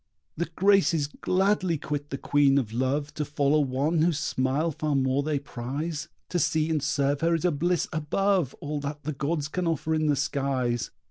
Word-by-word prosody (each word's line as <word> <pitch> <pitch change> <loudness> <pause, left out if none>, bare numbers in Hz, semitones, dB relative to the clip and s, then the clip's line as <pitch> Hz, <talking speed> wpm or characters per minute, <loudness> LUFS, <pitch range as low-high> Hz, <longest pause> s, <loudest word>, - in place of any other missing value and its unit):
The 170 +1 -2
Graces 190 -6 +4
gladly 185 +3 +1
quit 145 0 -4
the 135 - -3
Queen 140 0 +3
of 115 -6 -1
Love 140 +4 -1
To 150 - -2
follow 145 +1 +2
one 145 +4 +1
whose 165 -2 +2
smile 145 +2 0
far 150 0 -1
more 135 +1 +2
they 150 0 0
prize. 145 +4 -4 0.2
To 175 - 0
see 160 +1 +1
and 155 -2 +1
serve 140 -1 0
her 165 +1 +3
is 165 - -2
a 180 - +4
bliss 170 +4 0
above 170 0 +1
All 150 0 -3
that 145 +1 -5
the 155 +2 -3
gods 145 +2 -1
can 180 +3 -2
offer 160 -1 0
in 155 -1 +1
the 145 - +3
skies. 130 -4 -1
150 Hz, 190 wpm, -27 LUFS, 140-165 Hz, 0.2 s, Graces